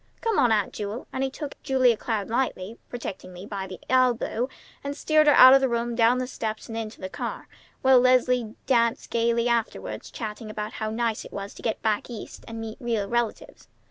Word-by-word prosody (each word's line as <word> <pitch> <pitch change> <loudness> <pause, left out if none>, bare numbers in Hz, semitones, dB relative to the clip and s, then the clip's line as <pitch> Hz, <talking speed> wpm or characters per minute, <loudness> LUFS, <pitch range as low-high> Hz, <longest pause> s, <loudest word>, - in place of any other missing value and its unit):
Come 455 -3 +1
on, 240 - +4
Aunt 210 -3 +1
Jewel!" 210 +3 -5
And 265 - -1
he 270 - 0
took 285 +1 -8
Julia 260 -4 +3
Cloud 215 -2 -2
lightly, 230 -4 -2
protectingly 185 -6 -7
by 195 -2 -5
the 185 -1 -9
elbow, 250 -1 +2 0.3
and 280 +1 -4
steered 310 -1 +3
her 295 - +7
out 260 +1 +10
of 270 - +6
the 265 - +2
room, 235 0 -1
down 230 +1 +4
the 255 - -1
steps, 220 -3 -5
and 225 - -7
into 225 -1 -5
the 185 - -4
car, - - -5 0.4
while 260 -1 +7
Leslie 250 -2 +3
danced 235 -3 +1
gayly 235 0 +2
after, 235 -2 0 0.2
chattering 215 -1 -7
away - - -6
about 210 0 -4
how 215 - -3
nice 225 0 -1
it - - -12
was 200 0 -6
to - - -12
get 225 - -2
back 215 0 0
East 235 -3 -8
and 225 0 -6
meet 225 -1 -6
real 230 -4 -1
relatives. 235 0 -3
235 Hz, 205 wpm, -26 LUFS, 215-255 Hz, 0.4 s, out